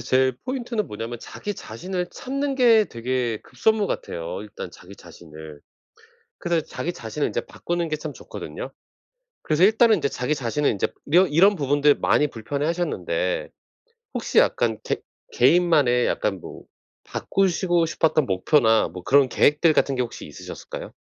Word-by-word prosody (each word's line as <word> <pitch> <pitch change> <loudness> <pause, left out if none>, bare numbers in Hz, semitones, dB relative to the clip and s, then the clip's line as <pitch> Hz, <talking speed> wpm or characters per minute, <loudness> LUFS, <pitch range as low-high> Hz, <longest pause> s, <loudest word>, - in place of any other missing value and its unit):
제 130 +2 +2
포인트는 240 -4 -3
뭐냐면 115 +3 -6
자기 205 - -6
자신을 180 - -5
찾는 275 +1 -3
게 230 -4 +5
되게 120 -1 -2
급선무 210 - +1
같아요 85 - -4
일단 105 -3 -8
자기 95 +2 -14
자신을. 80 -3 -12 0.8
그래서 170 -2 0
자기 175 - -4
자신을 115 +1 -3
인제 - - -3
바꾸는 170 -1 -3
게 155 - -1
참 155 -1 -6
좋거든요. - - -8 0.7
그래서 155 +3 +1
일단은 220 +2 +5
인제 160 -7 0
자기 125 +4 -1
자신을 140 +1 0
인제 100 - 0 0.2
이러 185 +3 +6
이런 190 +7 +4
부분들 145 -1 +3
많이 150 - +2
불편해하셨는데 175 - -2 0.6
혹시 - - -3
약간 - - +2
개 - - -2 0.3
개인만의 160 - +4
약간 95 -3 -1
뭐 - - -10 0.4
바꾸시고 175 -3 0
싶었던 155 -2 +1
목표나 110 +3 +3
뭐 90 0 -10
그런 140 +4 +4
계획들 150 +5 +3
같은 140 - +2
게 125 - 0
혹시 120 -1 -6
있으셨을까요? 75 - -9
150 Hz, 340 characters per minute, -23 LUFS, 120-185 Hz, 0.8 s, 이러